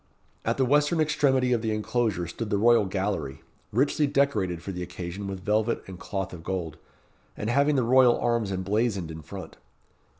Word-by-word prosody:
At - - 0
the 135 - +3
western 150 +5 +3
extremity 135 -5 +2
of 115 - +1
the 110 - -2
inclosure 110 -3 0
stood 105 +6 -5
the 105 - +1
royal 115 0 +5
gallery, 95 -7 -3 0.3
richly 140 +5 +2
decorated 135 - 0
for 100 - -4
the 90 -1 -5
occasion 90 +3 -6
with 95 -1 -6
velvet 110 +3 +1
and 95 -2 -10
cloth 95 -1 -4
of 85 -2 -9
gold, 85 -4 -4 0.6
and 105 +2 -2
having 140 +3 +3
the 130 - +2
royal 125 0 +5
arms 115 -4 0
emblazoned 95 -1 -1
in 80 0 -8
front. - - -9
105 Hz, 175 wpm, -26 LUFS, 95-125 Hz, 0.6 s, royal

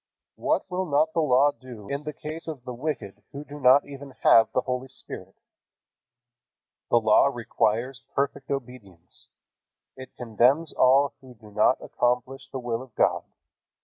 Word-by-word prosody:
What - - 0
will 185 0 -2
not 155 +2 +2
the 165 - +2
Law 140 0 +4
do 120 -7 -12
in 140 +2 -4
the 150 - -3
case 155 +3 -8
of 150 -6 -6
the 125 0 -6
wicked 120 -7 -5
who 140 +1 -6
do 145 0 -10
not 130 +1 +6
even 140 -1 -10
have 110 -1 +6
the 130 - +1
Holy 125 +1 -3
Spirit? 95 -7 -10 1.5
The 120 - +5
Law 110 +4 +5
requires 120 0 -1
perfect 140 0 -1
obedience. 115 -10 -7 0.7
It 130 0 -12
condemns 125 +7 +2
all 135 +2 +4
who 130 -2 -14
do 110 -1 -16
not - - +2
accomplish 125 +2 -1
the - - -4
will 120 -2 -3
of 130 -4 -14
God. - - +2
130 Hz, 155 wpm, -26 LUFS, 120-140 Hz, 1.5 s, not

